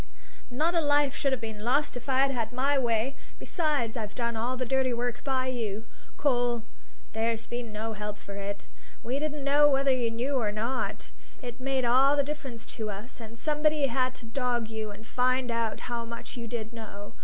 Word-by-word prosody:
Not 310 +7 +2
a 335 - +4
life 290 -2 +3
should 275 - +1
have 260 - +1
been 220 -2 -5
lost 285 +5 +2
if 245 +3 -6
I'd 270 +1 +4
had 230 -4 -1
my 270 +3 +2
way. 240 +2 +1 0.2
Besides, 295 - 0
I've 215 -3 -4
done 235 -1 0
all 240 +3 0
the 255 - -1
dirty 265 0 +2
work 240 0 -2
by 260 -2 +1
you, 225 -4 -2 0.3
Cole; 245 -4 +2 0.5
there's 225 0 0
been 240 -2 -4
no 220 +1 -3
help 210 0 -4
for 200 - -9
it. 200 0 -4 0.4
We 255 +4 -1
didn't 300 -1 -2
know 290 +1 +6
whether 275 0 +4
you 245 -2 +1
knew 240 +5 -1
or 215 -3 +1
not; 230 +5 -2 0.3
it 245 0 -6
made 265 -1 +1
all 265 +4 +6
the 285 - +5
difference 275 -5 -5
to 220 -2 -2
us; 210 +6 -7
and 230 0 -9
somebody 300 +1 +2
had 255 0 +1
to 235 - -9
dog 240 -1 0
you 220 -1 -3
and 205 +2 -10
find 255 +1 +2
out 230 -2 0
how 240 -1 -2
much 235 0 -7
you 235 -2 -5
did 225 -1 -4
know. 205 -3 -8
245 Hz, 200 wpm, -29 LUFS, 225-270 Hz, 0.5 s, know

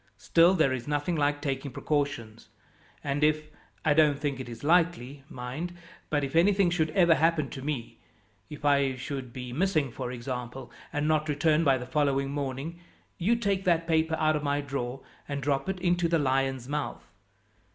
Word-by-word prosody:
Still 170 +3 +4
there 155 -6 +3
is 125 0 -5
nothing 145 +4 0
like 145 -1 0
taking 135 -1 -2
precautions, 140 -5 -3 0.5
and 145 +1 -1
if 155 0 +1 0.3
I 150 - +5
don't 150 -2 +4
think 140 -2 -2
it 130 - -6
is 115 - -9
likely, 155 -5 +1
mind 135 +9 -6 0.3
but 145 -2 +1
if 135 +2 -4
anything 190 +1 +4
should 160 -2 +1
ever 170 -3 +6
happen 160 -1 +1
to 135 - -7
me 135 -4 -4 0.5
if 150 -1 -8
I 140 -2 +3
should 130 -1 -5
be 125 0 -7
missing, 155 -4 +1
for 125 +1 -5
example, 125 0 -6 0.2
and 145 +1 -1
not 155 0 +1
return 155 +2 +2
by 135 -4 +4
the 125 - -6
following 140 0 0
morning 140 +4 -4 0.4
you 205 +7 +3
take 200 -4 0
that 170 -2 +2
paper 160 -1 +2
out 155 0 +2
of 150 - -1
my 145 0 0
drawer 135 -2 -4 0.3
and 140 0 -2
drop 140 +4 0
it 190 -1 -2
into 175 -1 +2
the 165 0 +2
Lion's 135 -3 0
Mouth. 145 0 -4
145 Hz, 180 wpm, -28 LUFS, 135-160 Hz, 0.5 s, ever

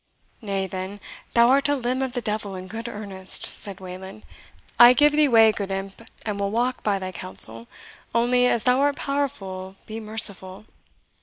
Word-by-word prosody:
"Nay, 195 -3 -2
then, 190 +2 -6 0.4
thou 235 0 +6
art 275 +2 +3
a 290 - +2
limb 255 0 -2
of 260 -2 -2
the 245 -2 -3
devil 210 -3 -3
in 185 0 -7
good 225 +4 -7
earnest," 200 -4 -6
said 195 -2 -4
Wayland. 190 +2 -10 0.5
"I 240 +1 +10
give 295 +3 +5
thee 300 0 +4
way, 225 -3 +6
good 200 -2 -5
imp, 195 +2 -5 0.2
and 210 -2 -3
will 200 0 -1
walk 245 +4 -1
by 205 -2 0
thy 185 -1 -5
counsel; 115 -11 +2 0.5
only, 245 +1 +3
as 235 - +1
thou 250 +1 +3
art 285 0 +2
powerful 195 -10 -4
be 220 +1 -7
merciful." 205 -2 -3
215 Hz, 175 wpm, -24 LUFS, 190-245 Hz, 0.5 s, I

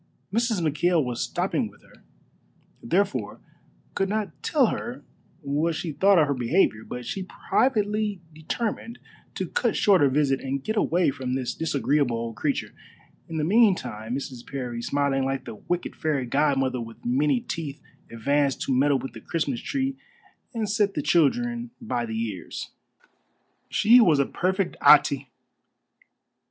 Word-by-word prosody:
Mrs. 230 -3 +1
McKail 160 +2 +2
was 120 -1 -3
stopping - - -1
with - - -21
her, - - -21 0.8
therefore 195 - -1 0.5
could 195 0 0
not 205 -8 -3
tell 285 -4 +3
her 240 +2 -6 0.4
what 150 +3 0
she 165 0 -3
thought 195 +6 +4
of 155 - +5
her 140 - 0
behavior; 125 - +1
but 125 +1 -7
she 195 - -4 0.3
privately 210 -5 +1
determined 225 +8 -4 0.4
to - - -3
cut 485 - 0
short 195 -5 +4
her 140 - +5
visit 135 -1 +1
and 135 0 -3
get 220 - -2
away 175 -6 +2
from 130 -1 -3
this 130 -2 -2
disagreeable 140 -5 0
old 115 -1 -4
creature. - - -2 0.6
In 165 - -4
the 155 - 0
meantime 150 - +2
Mrs. 130 -3 -6
Parry, 125 -4 -5
smiling 140 +1 0
like 135 0 -2
the - - -6
wicked 175 +11 -4
fairy 145 -5 -1
godmother 135 -1 +1
with 115 0 -10
many 135 +2 +2
teeth, 145 +1 -5 0.3
advanced 140 +4 0
to 135 - 0
meddle 140 +2 +3
with 135 - -7
the - - -10
Christmas 145 -7 -2
tree 270 -1 -2 0.5
and 225 -4 -2
set 205 -1 +1
the 150 - -1
children 240 - +2
by 120 - -2
the 110 0 -3
ears. 105 -7 -5 1.0
She 235 +4 +6
was 165 -9 +5
a 140 - +3
perfect 190 +4 -1
Atê. - - +6
150 Hz, 150 wpm, -25 LUFS, 130-200 Hz, 1.0 s, She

